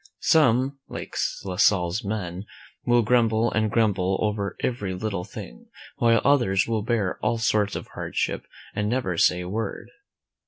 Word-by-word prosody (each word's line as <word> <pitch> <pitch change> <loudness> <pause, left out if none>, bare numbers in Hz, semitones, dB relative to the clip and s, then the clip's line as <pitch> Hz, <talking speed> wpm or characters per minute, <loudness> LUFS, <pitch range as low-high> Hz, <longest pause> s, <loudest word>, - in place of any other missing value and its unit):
Some, 135 -3 +3
like - - -7 0.3
La 90 -2 -4
Salle's 90 +2 +3
men, 100 -2 -4 0.4
will 120 -1 +4
grumble 115 0 +2
and 110 -1 +1
grumble 100 -4 +1
over 105 -2 -2
every 105 -7 -2
little 100 -2 -3
thing, - - -10 0.3
while 115 -1 +4
others 120 -9 +3
will 115 -2 0
bear 105 -4 -1
all 115 - +1
sorts 105 -3 +1
of - - -6
hardship - - -3 0.3
and 105 0 -1
never 115 -8 -1
say 90 +2 +3
a 90 - -6
word. 105 +2 -4
110 Hz, 150 wpm, -25 LUFS, 95-115 Hz, 0.4 s, will